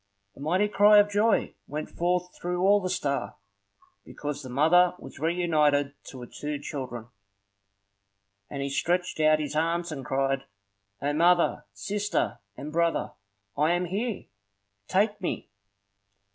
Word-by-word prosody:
A - - -16
mighty 180 +8 +1
cry 210 0 +6
of 205 0 +5
joy 215 +2 +2
went 150 +2 -4
forth 180 +1 -1
through 175 0 -3
all 205 +1 +5
the 185 - -2
star, 145 -6 -2 0.7
because 145 +4 -6
the 130 - -9
mother 170 +7 +4
was - - -12
reunited 155 -4 +2
to 130 - -10
her - - -6
two 145 +4 -5
children. 125 -5 -6 1.4
And 140 -1 -4
he 140 - -2
stretched 175 +4 -1
out 155 0 +5
his 150 -1 -4
arms 170 +2 0
and 135 -3 -5
cried, 135 +1 -1 0.6
"O 145 +1 0
mother, 170 +3 +3
sister, 205 0 -2 0.2
and 150 - -6
brother, 170 0 +1 0.4
I 155 +4 +2
am 175 +1 0
here! 205 +5 -3 0.6
Take 210 +2 +1
me!" 170 - -4
165 Hz, 140 wpm, -27 LUFS, 145-180 Hz, 1.4 s, cry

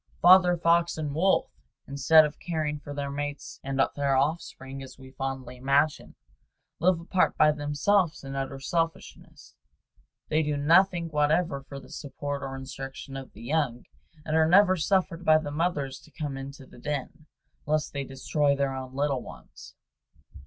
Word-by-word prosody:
Father 180 0 +7
fox 170 0 +2
and 150 -2 -3
wolf, 185 +6 +2 0.4
instead 145 +3 +5
of 150 0 -6
caring 155 -4 -2
for 145 0 -10
their 140 -1 -4
mates 145 0 -5
and 135 0 -3 0.2
their 140 -2 +1
offspring, 135 -2 -2
as 135 - -11
we 130 0 -13
fondly 135 -2 -5
imagine, 140 +4 +1 0.6
live 175 +1 +3
apart 180 +2 +1
by 150 - +6
themselves 150 +5 0
in 135 0 -6
utter 135 0 -4
selfishness. 165 +4 -4 0.7
They 155 +1 +2
do 150 -1 -1
nothing 170 +3 +3
whatever 150 0 +1
for 140 0 -9
the 130 - -15
support 145 0 -5
or 135 -1 -5
instruction 135 0 -8
of 135 -1 -8
the 110 - -12
young, 135 -3 -1 0.4
and 155 - -1
are 160 0 +4
never 185 +1 +6
suffered 180 0 0
by 155 -2 +6
the 150 -2 -4
mothers 145 -4 -1
to - - -19
come 150 -3 -5
into 135 0 -8
the 120 - -16
den, 150 +3 -5 0.4
lest 155 0 0
they 140 -1 -2
destroy 140 +2 0
their 140 -1 0
own 130 0 -7
little 140 -2 0
ones. - - -13
145 Hz, 160 wpm, -27 LUFS, 135-160 Hz, 0.7 s, Father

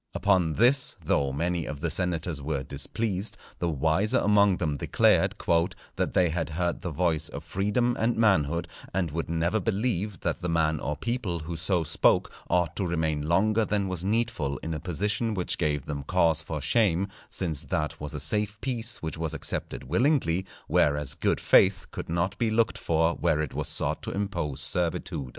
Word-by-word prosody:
_" - - -25
Upon 95 -5 +2
this, 125 - +3
though 70 -1 +2
many 85 +3 -1
of 75 -2 -5
the - - -1
senators 85 -3 -2
were 70 -1 -2
displeased, 100 +9 -3 0.2
the 85 - 0
wiser 80 - +1
among 100 -3 +4
them 75 -4 -1
declared - - +3
"_that 85 +1 -1
they 90 -2 +4
had 80 0 -2
heard 85 +2 -1
the 85 - -3
voice 80 -1 0
of - - -7
freedom 110 +5 0
and 115 +1 +1
manhood, 85 -6 +2 0.3
and 90 -5 0
would 80 +1 -3
never 85 +6 +1
believe 105 - -1
that - - -1
the 90 - -2
man 80 -2 +1
or 75 +1 -3
people 115 -8 -2
who 85 +2 -5
so 85 +2 0
spoke 75 - +2 0.2
ought 90 -2 +1
to 95 - 0
remain 80 -3 -1
longer 110 +6 +3
than 105 -2 0
was 90 -2 -3
needful 100 - 0
in 80 - -3
a 75 - -3
position 105 +6 -1
which 90 -2 -1
gave 75 -3 0
them 70 -2 -4
cause 80 +3 +2
for 75 -2 -5
shame; 100 - +2 0.2
since 80 -6 -1
that 75 -1 -2
was 75 +1 -6
a - - -3
safe 105 +8 0
peace 120 -3 -2
which 80 0 -4
was 80 -2 -1
accepted - - -3
willingly; 95 - +1 0.2
whereas 75 -2 +2
good - - 0
faith - - +4
could - - -6
not 85 +3 0
be 115 - +2
looked 110 0 +1
for 80 +1 +2
where 75 - +1
it 75 -3 -2
was - - -2
sought - - -1
to - - -5
impose 85 -9 -3
servitude. 75 -2 -2
85 Hz, 185 wpm, -27 LUFS, 80-100 Hz, 0.3 s, among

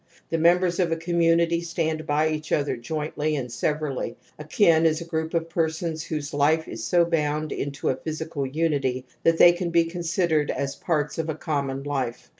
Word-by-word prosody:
ihe 165 - +2
members 175 +1 +3
of 175 -3 +2
a - - +2
community 170 0 +2
stand 160 -2 -2
Dy 155 +2 +2
each 155 0 -6
other 145 -1 +1
.jointly 150 +4 -2
and 125 -3 -4
severally, 145 -6 -2 0.2
a - - -6
kin 165 0 +4
is 155 0 +1
a 170 - -7
group 160 0 -3
of 165 0 0
persons 160 -1 -2
whose 150 -1 -4
Ufe 155 +2 +2
is 110 - -6
so 170 +9 +3
bound 155 -2 -1
into 140 +1 -3
a - - +1
physical 160 -2 -4
unity 135 -4 -1 0.2
that 165 0 +3
they 175 - +8
can 175 0 -3
be 170 0 +4
considered 165 -2 0
as 140 0 -2
parts 150 -3 -1
of 160 0 -2
a 155 - -2
common 140 -4 -2
Hfe. 135 -4 -3
160 Hz, 190 wpm, -25 LUFS, 145-165 Hz, 0.2 s, they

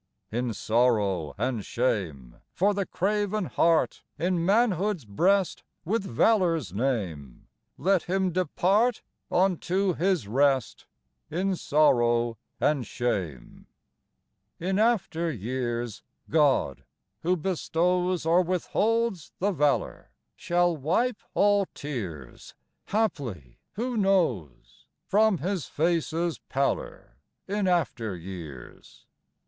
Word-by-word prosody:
In 120 +2 -1
sorrow 105 - +1
and 115 -1 -1
shame 95 - -2 0.2
For 200 +3 +2
the 200 -1 -2
craven 205 +1 0
heart, 165 0 +2 0.2
In 175 -1 0
manhood's 200 - +2
breast 185 - +1 0.2
With 215 +5 0
valor's 165 - +2
name, 95 - -3 0.3
Let 190 +2 +2
him 190 0 0
depart 190 +7 +1 0.3
Unto 185 +1 +1
his 180 - 0
rest 135 +1 +1 0.4
In 185 +4 0
sorrow 120 - +2 0.2
and 145 -4 +2
shame. 95 - -4 0.9
In 190 +3 0
after 195 -7 +1
years 120 -1 -3 0.3
God, 145 - +2 0.4
who 180 +2 +1
bestows 180 0 0
Or 170 +2 +4
withholds 195 +2 0
the 200 +3 +1
valor, 150 -6 0 0.3
Shall 175 0 +1
wipe 185 - 0
all 205 -1 +3
tears 95 - -7 0.3
Haply, 130 - -2
who 235 +4 -2
knows? 160 - 0 0.2
From 215 -1 +3
his 180 0 -3
face's 165 0 0
pallor 135 0 -2 0.3
In 200 0 -1
after 135 - 0
years. 85 -6 -10
165 Hz, 100 wpm, -27 LUFS, 120-190 Hz, 0.9 s, Or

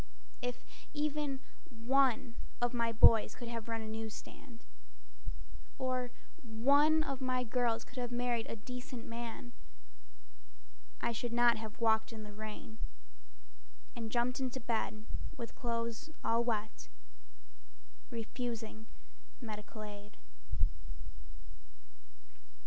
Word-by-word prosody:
If 245 -1 -2 0.3
even 295 -2 0 0.3
one 245 0 +3 0.3
of 245 0 +2
my 230 -1 +2
boys 225 -1 +8
could 240 -2 -5
have 230 -1 -4
run 225 0 0
a - - -5
news 220 0 -3
stand, 235 -3 -11 1.1
Or 255 -1 0 0.3
one 280 +7 +5
of 275 -3 -3
my 255 -1 +2
girls 235 -1 +2
could 255 - -7
have 245 -1 -1
married 240 -1 +1
a - - -2
decent 250 +1 -6
man, 235 +1 -5 1.5
I - - +2
should 235 +1 -2
not 240 -1 +6
have 220 -1 -6
walked 220 -1 +4
in 220 -1 -6
the 210 -1 -8
rain 210 - -7 1.2
And 230 -2 -3
jumped 245 +3 +2
into 260 0 -1
bed 220 -2 -1 0.3
with 230 - -5
clothes 235 +4 -1
all 230 +1 +4
wet, 215 - -1 1.2
Refusing 225 -1 -3 0.5
medical 215 -2 -6
aid. 205 0 -9
235 Hz, 110 wpm, -36 LUFS, 220-250 Hz, 1.5 s, boys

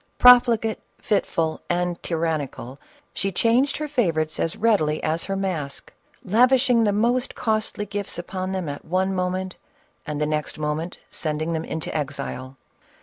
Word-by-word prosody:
Profligate, 240 -3 +6 0.2
fitful 165 -6 0
and 175 0 -1
tyrannical, 155 -6 -3 0.3
she 195 +1 -1
changed 235 +8 +2
her 305 - -3
favorites 165 - 0
as 165 - 0
readily 200 -9 +2
as 160 +2 0
her 195 - -2
mask, 170 -8 -3 0.3
lavishing 245 +3 +4
the 210 - +3
most 240 +5 +1
costly 215 -2 -1
gifts 205 0 -5
upon 185 +2 -4
them 185 -3 -2
at 145 0 -5
one 190 +3 0
moment, 185 0 -2 0.5
and 150 -1 -3
the 150 - +1
next 150 0 -2
moment 155 +3 -3
sending 155 +1 -2
them 160 0 -2
into 160 - -4
exile. 135 -2 -4
180 Hz, 145 wpm, -24 LUFS, 155-215 Hz, 0.5 s, Profligate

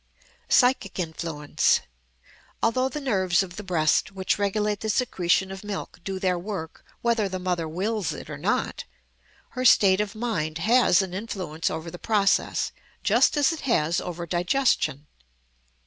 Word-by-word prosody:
Psychic 250 -6 +3
Influence. 160 -4 0 0.8
Although 255 +3 +2
the 300 - -5
nerves 190 -9 +1
of 175 -2 -9
the 210 - -6
breast 165 -4 +1
which 190 +1 -1
regulate 210 +1 0
the 220 - -3
secretion 190 -5 +1
of 195 +1 -8
milk 205 -3 -6
do 195 -1 -4
their 185 -2 0
work 180 -4 -6 0.2
whether 230 -4 +1
the 185 - -3
mother 180 -3 -2
wills 195 +1 -1
it - - -8
or - - -7
not, - - -1 0.6
her 255 - -4
state 200 -5 +6
of 210 +1 -4
mind 170 -10 -2
has 215 -1 +4
an 185 -2 -6
influence 185 -6 -3
over 165 +1 -5
the 175 - -9
process, 205 -3 +1 0.3
just - - +3
as 290 +2 +3
it 325 - -6
has 170 - +1
over 175 -1 -5
digestion. 175 - +1
190 Hz, 150 wpm, -25 LUFS, 175-220 Hz, 0.8 s, state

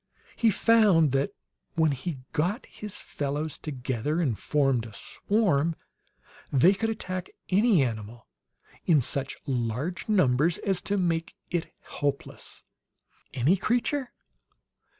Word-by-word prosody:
He 230 - +3
found 205 - +5
that, 135 +8 +1 0.4
when 160 -2 +3
he 140 +3 -4 0.2
got 180 - 0
his 210 -2 -7
fellows 145 +1 -3
together 135 +1 -2
and 140 -10 +1
formed 135 -3 +1
a 110 - -12
swarm, 170 - +1 0.8
they 155 +8 +6
could 225 +3 -1
attack 185 -4 -4 0.2
any 200 - +4
animal 110 -1 -5 0.6
in 150 -6 +5
such 135 +3 -2
large 130 - -2
numbers 155 -4 +3
as 190 -3 0
to 205 - +2
make 165 -3 0 0.2
it 175 -2 -2
helpless." 145 -1 -4 0.7
"Any 135 +8 +4
creature?" 245 +6 0
160 Hz, 115 wpm, -27 LUFS, 135-195 Hz, 0.8 s, they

